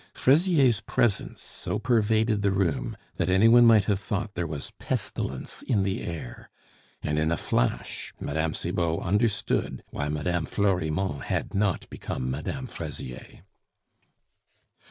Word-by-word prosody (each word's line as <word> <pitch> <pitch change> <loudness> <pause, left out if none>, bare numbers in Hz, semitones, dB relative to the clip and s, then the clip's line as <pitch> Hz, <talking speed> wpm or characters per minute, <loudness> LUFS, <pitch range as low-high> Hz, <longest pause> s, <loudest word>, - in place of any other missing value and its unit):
Fraisier's 140 - +4
presence 110 -5 0
so - - -4
pervaded 110 -2 +2
the 100 - +3
room, 95 -5 0 0.2
that 85 - 0
any 95 +4 +5
one 120 +1 +8
might 110 -3 +6
have 100 -3 +1
thought 100 +1 -3
there 85 -3 -2
was 75 -3 -5
pestilence 65 +1 -3
in 105 -6 +1
the 95 0 -1
air; 80 -8 -7 0.5
and 75 0 0
in 80 +1 +1
a 85 - +1
flash - - -1
Mme. 80 +2 -1
Cibot 85 -2 -1
understood 105 +4 0
why 75 - -2
Mme. 80 +2 -1
Florimond 95 -4 0
had - - -2
not 100 -2 0
become 65 0 -4
Mme. 75 - -4
Fraisier. 75 - -7
95 Hz, 135 wpm, -27 LUFS, 80-110 Hz, 0.5 s, one